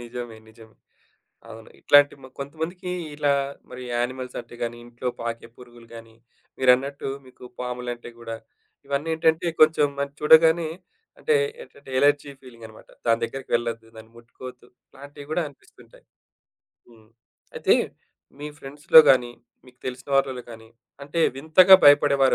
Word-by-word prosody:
నిజమే. 120 -1 -8
నిజమే. 110 -1 -18 0.8
అవును. 110 0 -12
ఇట్లాంటి 145 0 +5
మ - - -10
కొంతమందికి 160 +6 -6 0.2
ఇలా 145 -1 +1 0.4
మరి 125 - -10
యానిమల్స్ 125 +1 -4
అంటే 120 +1 -15
గాని, 120 0 -4
ఇంట్లో 120 +1 -7
పాకే 115 0 -5
పురుగులు 120 -2 -16
గాని, 115 -1 -13 0.4
మీరన్నట్టు 130 +2 +2 0.2
మీకు 130 - -18 0.2
పాములంటే 125 -1 -6
గూడా. 115 -1 -7 0.5
ఇవన్నేంటంటే 160 +3 0
కొంచెం 155 -2 +5
మన 140 - -1
చూడగానే 160 +2 +5 0.5
అంటే 465 -2 +1 0.3
ఏంటంటే 140 - -16
ఎలర్జీ 145 0 +2
ఫీలింగ్ 115 -3 -14
అనమాట. 110 - -17 0.2
దాని 115 0 +2
దగ్గరకి 130 +3 -6
వెళ్ళద్దు, 115 -1 -4
దాన్ని 110 0 -14
ముట్టుకోవద్దు 125 +1 -13 0.3
అలాంటియి 145 +1 -13
గూడా 170 +2 -1
అనిపిస్తుంటాయి. 140 - -20 0.8
హ్మ్. 110 -2 -21 0.5
అయితే - - +3 0.7
మీ 150 - -6
ఫ్రెండ్స్‌లో 145 +3 +5
గాని, 125 -2 +3 0.4
మీకు 125 0 -20
తెలిసిన 130 +2 -7
వార్లలో 130 -2 -1
గాని 115 0 -13 0.3
అంటే 150 +4 -3 0.2
వింతగా 175 +6 +6
భయపడేవారు 145 -2 +5
130 Hz, 130 wpm, -23 LUFS, 120-145 Hz, 0.8 s, వింతగా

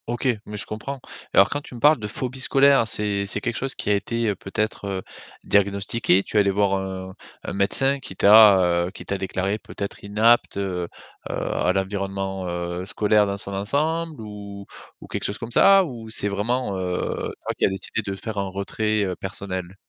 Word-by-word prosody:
OK, 120 +3 -2 0.2
mais 105 - -6
je - - -1
comprends. 130 +6 -6 0.3
Alors 100 - +6
quand 145 - -2
tu 130 - -12
me - - -8
parles 150 +2 +5
de 105 - -4
phobie 130 +5 -5
scolaire, 135 -2 +4
c'est 100 -1 0
c'est - - 0
quelque 120 -3 -3
chose 135 0 -2
qui - - -4
a - - +5
été 115 +2 -1
peut-être, 105 +3 -3
heu, 95 -1 -3 0.4
diagnostiqué? 100 0 +2
Tu - - -3
es - - +7
allée 100 -1 +3
voir 100 0 +2
un 95 -1 -5 0.3
un - - -5
médecin 135 +8 +2
qui 125 -8 -9
t'a, 105 0 +8 0.3
heu, - - -7
qui - - -11
t'a 100 - -2
déclarée 95 +2 -2
peut-être 100 -1 -7
inapte, 110 +2 +3
heu, 90 -3 -2 0.4
heu, - - -3
à 90 - 0
l'environnement, 95 -1 -3
heu, 85 +1 -4
scolaire 105 0 +2
dans 100 0 -2
son 100 0 -5
ensemble 150 +8 -1
ou 100 -2 -9 0.4
ou - - -11
quelque - - -4
chose 100 - -2
comme 115 0 -7
ça 195 +9 +6
ou 115 -7 -8
c'est 105 -2 +1
vraiment, 105 +2 -1
heu, 90 -1 -2
toi - - -2
qui - - +2
a - - +3
décidé 95 0 -3
de 100 - -5
faire 105 +1 -5
un 100 -1 -2
retrait, 105 +2 -1
heu, 95 -2 -2
personnel? 95 -1 -5
100 Hz, 200 wpm, -23 LUFS, 95-115 Hz, 0.4 s, t'a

